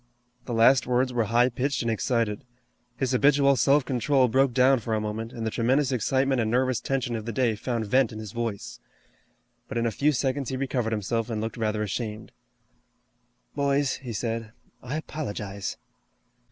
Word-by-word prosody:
The 120 - -4
last 120 +3 +5
words 125 +1 +1
were 120 -2 +1
high 120 +3 +3
pitched 130 +1 -1
and 115 - 0
excited. 115 -1 -1 0.5
His 130 0 -1
habitual 140 +1 +4
self 140 +1 +3
control 130 +1 +2
broke 135 +3 +3
down 130 +1 +4
for 110 0 -2
a - - 0
moment, 110 +2 -4
and 115 -3 -5
the 110 - -1
tremendous 130 +5 +1
excitement 130 +2 +1
and 110 - 0
nervous 130 +1 +1
tension 130 -3 -2
of 110 -1 -5
the - - -1
day 115 -1 +1
found 115 +1 -3
vent 130 +3 +2
in 110 - -8
his 110 -2 -7
voice. 110 - -4 0.9
But - - -5
in 115 - 0
a 115 - +1
few 145 +7 +2
seconds 135 0 -1
he 130 - -3
recovered 130 -4 -1
himself 115 +2 -1
and 110 -2 -2
looked 110 +1 -4
rather 110 -2 -1
ashamed. 105 +1 -4 1.2
"Boys," 140 -1 +1
he 125 -3 -8
said, 115 0 -3 0.3
"I 130 +5 -4
apologize." 105 -11 -5
120 Hz, 180 wpm, -26 LUFS, 110-135 Hz, 1.2 s, last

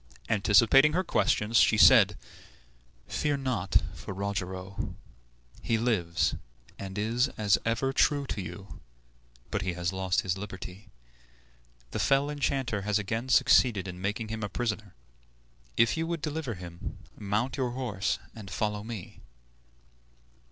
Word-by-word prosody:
Anticipating 110 +8 +5
her 185 +3 +1
questions, 115 - +1
she - - +4
said, - - +7 0.9
"Fear 145 -2 0
not 125 -9 0
for 100 - -8
Rogero; 95 -1 -4 0.7
he 115 - +1
lives, 105 -8 +1 0.5
and 95 0 -6
is 115 +5 +1
as 105 -2 +3
ever 115 +4 0
true 145 0 +2
to 105 - -4
you; 90 +2 -9 0.7
but - - -1
he 95 -1 -2
has 85 +1 -2
lost 95 -1 0
his 95 0 -2
liberty. 95 0 -8 1.0
The - - -3
fell 140 +2 +2
enchanter 135 -7 -1
has 105 +1 +1
again 115 +5 -3
succeeded 120 -5 +4
in 90 0 -7
making 105 +3 -2
him 110 0 -4
a 105 - -3
prisoner. 110 -4 -3 0.8
If 115 - +4
you 165 0 -2
would 170 -3 -3
deliver 150 -6 -3
him, 85 -1 -8 0.2
mount 105 +6 -1
your 130 -2 0
horse 110 -6 -1 0.2
and 105 -4 -10
follow 105 0 -2
me." 110 -5 -8
105 Hz, 135 wpm, -29 LUFS, 95-125 Hz, 1.0 s, said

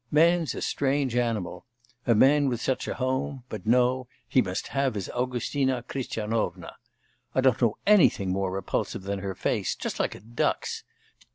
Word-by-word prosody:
Man's 165 +2 +3
a - - -4
strange 135 -2 0
animal. 115 -4 -1 0.4
A 115 - +5
man 140 +5 +5
with 120 -3 -2
such 130 +2 -1
a - - -2
home; 130 0 -2
but 105 -2 -7
no, 125 +2 +3 0.2
he 130 - +4
must 95 -2 -3
have 135 -4 0
his 100 -3 -4
Augustina 125 +1 -1
Christianovna! 115 -4 -3 0.6
I 130 - +4
don't 130 -2 +3
know 115 -3 +2
anything 175 - +5
more 95 0 0
repulsive 95 0 -2
than 100 0 -3
her 95 -1 -4
face, - - -1
just - - -4
like - - 0
a - - -10
duck's! 115 +4 -2
125 Hz, 165 wpm, -27 LUFS, 105-135 Hz, 0.6 s, A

